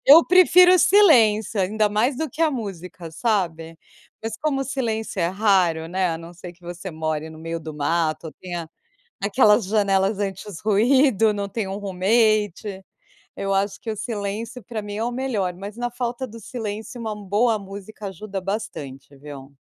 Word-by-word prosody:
Eu 310 +5 +8
prefiro 365 0 +7
o - - +5
silêncio 230 - +5
ainda 210 +3 +1
mais 225 +6 +1
do 315 +3 -2
que 300 +6 -3
a 320 - +4
música 185 - -6
sabe? 165 -5 -1 0.4
Mas 225 0 -4
como 285 -3 -1
o - - -5
silêncio 225 -7 -3
é 170 - +2
raro, 185 -5 +2
né, 185 +2 0
a 165 - -3
não 165 +1 -10
ser 175 0 -10
que 175 - -28
você 175 +2 -7
more 155 -1 -3
no 160 - -12
meio 165 +1 -5
do 155 0 -7
mato 155 +2 -1
ou 155 - -8
tenha 175 -3 -7 0.5
aquelas 210 +1 +4
janelas 195 0 +1
antirruído, 215 - +2
não 200 -1 -3
tenha 195 -2 -3
um 195 - -4
roommate, 205 0 +1 0.5
eu 195 0 -1
acho 195 +1 0
que 230 - -7
o - - -4
silêncio 220 +2 -4
pra 220 +1 -5
mim 205 0 -7
é 220 - -2
o 240 - -1
melhor, 240 -8 -1
mas 200 +5 -9
na 245 0 -2
falta 245 +1 -3
do 230 +1 -11
silêncio 225 +1 -6
uma 220 -2 -4
boa 210 +3 +1
música 200 +1 -9
ajuda 195 0 -6
bastante, 145 -10 -6
viu. 140 -1 -11
205 Hz, 175 wpm, -23 LUFS, 180-230 Hz, 0.5 s, Eu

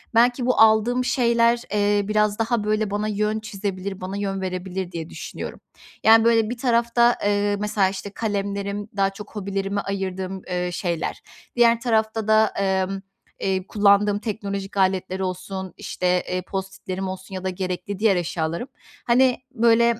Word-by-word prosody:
Belki 245 +2 +4
bu 250 - +2
aldığım 225 +3 +4
şeyler, 235 -2 +3
eee, 205 -1 +2
biraz 210 0 +1
daha 225 -1 +1
böyle 215 -1 0
bana 210 +1 -1
yön 210 +1 0
çizebilir, 195 -3 -5
bana 190 +2 -4
yön 195 -1 -2
verebilir 185 0 -4
diye 165 -1 -5
düşünüyorum. - - -7 0.4
Yani 225 0 +7
böyle 225 -2 +4
bir 245 - -4
tarafta, 235 -1 +3
eee, 205 0 +2
mesela 210 -2 +1
işte 200 +1 -6
kalemlerim, 200 -1 -3
daha 195 0 +3
çok 205 +2 -11
hobilerime 200 0 -2
ayırdığım, 190 -1 -4
eee, 180 -1 -1
şeyler, 170 -3 -2 0.3
diğer 235 -1 +5
tarafta 220 -2 0
da, 220 0 +5
emm, 190 0 0 0.4
eee, 190 -1 -1
kullandığım 205 0 +3
teknolojik 200 -2 -4
aletleri 190 0 +1
olsun, 185 0 -4
işte, 180 - -3 0.2
eee, 185 0 -1
post-it'lerim 190 0 -5
olsun 190 +1 -7
ya 185 - -5
da 190 - 0
gerekli 185 +1 -4
diğer 215 -3 +4
eşyalarım, 170 +5 -2 0.4
hani 250 +1 +4
böyle 235 -1 +3
200 Hz, 150 wpm, -23 LUFS, 190-220 Hz, 0.4 s, Yani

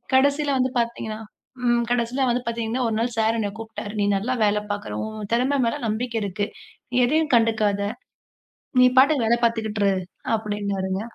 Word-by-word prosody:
கடைசியில 285 +2 +3
வந்து 255 0 +1
பார்த்தீங்கன்னா 230 -2 -3 0.5
ம் 240 0 +3
கடைசில 245 +2 +1
வந்து 245 +1 +1
பார்த்தீங்கன்னா 230 +1 -2
ஒரு 225 - -1
நாள் 230 +2 +1
சார் 225 +1 +2
என்ன 215 -2 0
கூப்பிட்டாரு. 215 -2 -7
"நீ - - +2
நல்லா 220 +6 -1
வேலை 210 0 +2
பாக்குற, 205 +1 -4
உன் 215 -1 -6
திறமை 255 +4 +2
மேல 230 - 0
நம்பிக்கை 230 +2 -2
இருக்கு. 200 +1 -2 0.5
நீ - - -3
எதையும் 310 +4 +1
கண்டுக்காத! 215 -3 +2 1.0
நீ - - +8
பாட்டுக்கு 275 -3 +4
வேலை 235 +1 +3
பாத்துக்கிட்டு 220 -2 -1
இரு" - - +4 0.4
அப்பிடின்னாருங்க. 200 -3 -2
225 Hz, 160 wpm, -23 LUFS, 210-245 Hz, 1.0 s, நீ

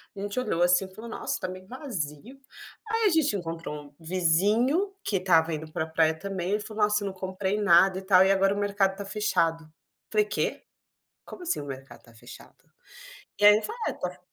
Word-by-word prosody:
a - - -8
gente 205 +4 -3
olhou 175 -8 0
assim 180 +2 +3
e 190 0 -15
falou: 230 +3 -9
"Nossa, - - -3
tá 185 - -2
meio 185 0 -10
vazio". 240 - -6 0.5
Aí 450 0 +1
a - - +6
gente 320 - +2
encontrou 165 -4 -5
um 145 -1 -11
vizinho 205 - +1
que 200 - 0
estava 170 -3 +3
indo 155 0 -6
para 160 0 -2
praia 160 0 +2
também, 195 +2 -2
falou: 215 0 -3
"Nossa, 210 0 +2
não 195 - -4
comprei 190 +2 -3
nada 190 -1 +5
e - - -9
tal 190 -1 +5
e 190 - +4
agora 195 0 +2
o - - -5
mercado 200 -1 +1
tá 200 - -6
fechado". 165 -6 0 0.4
Falei: 215 -1 +3
"Quê? 210 - -2 0.6
Como 360 - -10
assim 350 - -1
o 145 - -7
mercado 135 0 -9
tá 115 - -19
fechado?" 115 - -14 0.8
E - - +2
aí 210 0 +9
eu - - -7
falei: 465 +2 -6
"É - - -2
tá 180 0 -5
190 Hz, 205 wpm, -27 LUFS, 165-210 Hz, 0.8 s, aí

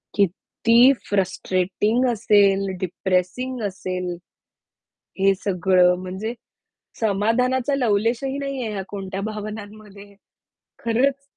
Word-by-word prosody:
किती 200 +4 0 0.3
फ्रस्ट्रेटिंग 195 +4 0
असेल, 200 -3 +3
डिप्रेसिंग 190 +8 -1
असेल, 180 -2 -4 1.0
हे 195 0 +4
सगळं. 180 -1 +3
म्हणजे 190 +5 -5 0.7
समाधानाचा 235 +6 +1
लवलेशही 240 +3 0
नाहीये 270 -5 -3
ह्या 195 -2 -3
कोणत्या 195 -1 -5
भावनांमध्ये. 210 -1 -8 0.7
खरंच! 265 +4 +1
205 Hz, 80 wpm, -22 LUFS, 190-230 Hz, 1.0 s, हे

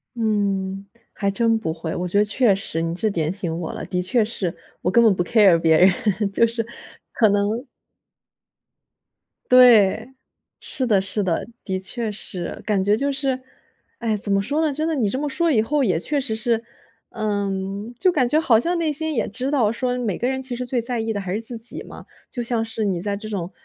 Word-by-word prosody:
嗯， 200 -3 -1 0.3
还 200 -1 -1
真 225 +2 +2
不 160 -6 -3
会， 160 -1 -5
我 180 0 -2
觉 200 - 0
得 205 - +5
确 210 0 +3
实， 165 -4 -2
你 165 0 -2
这 220 +3 0
点 160 -4 -1
醒 180 -4 -1
我 165 -2 -5
了， - - -6
的 180 -1 -2
确 215 +5 +2
是， 195 -6 -3 0.3
我 180 - 0
根 235 +2 +5
本 215 -3 +5
不 175 - 0
care 195 -4 +5
别 160 -1 +3
人 200 +1 +2
就 230 - +4
是， 230 -1 -3 0.5
可 220 -3 +4
能 205 +4 0 1.9
对， 240 -1 +6 0.5
是 260 - -2
的 205 -5 +3
是 200 +1 -1
的， 180 +4 -1 0.2
的 190 -2 -2
确 220 +3 -4
是。 185 -3 -5
感 200 -3 0
觉 205 +2 +3
就 280 +4 0
是， 270 -2 -1 0.6
哎 225 -2 -1
怎 205 0 -1
么 195 - +3
说 295 +7 0
呢， 310 -2 +1
真 310 +3 -2
的 325 - 0
你 230 -8 +1
这 260 - -2
么 295 +1 -2
说 330 +4 +1
以 225 - +3
后 280 +5 +1
也 185 -8 +2
确 285 - 0
实 220 -5 -2
是， 230 +1 0 0.5
呃， 205 -2 -2 0.5
就 370 - +4
感 260 -7 +2
觉 300 +5 +3
好 240 -8 +4
像 345 +7 0
内 315 -3 0
心 315 0 -2
也 225 - 0
知 255 +5 -3
道 240 -7 +2
说 250 +1 -2
每 225 -7 -2
个 245 - 0
人 265 0 -1
其 260 -2 -4
实 250 - -4
最 245 0 -1
在 240 0 -2
意 225 0 -2
的 205 - -2
还 190 -1 -4
是 215 - -2
自 230 +1 -5
己 225 +2 -4
嘛。 - - -11 0.2
就 245 -2 -4
像 230 -1 0
是 220 -1 -3
你 180 -3 -1
在 200 0 -1
这 215 +1 -8
种， 190 -4 -4
220 Hz, 240 characters per minute, -22 LUFS, 195-250 Hz, 1.9 s, 对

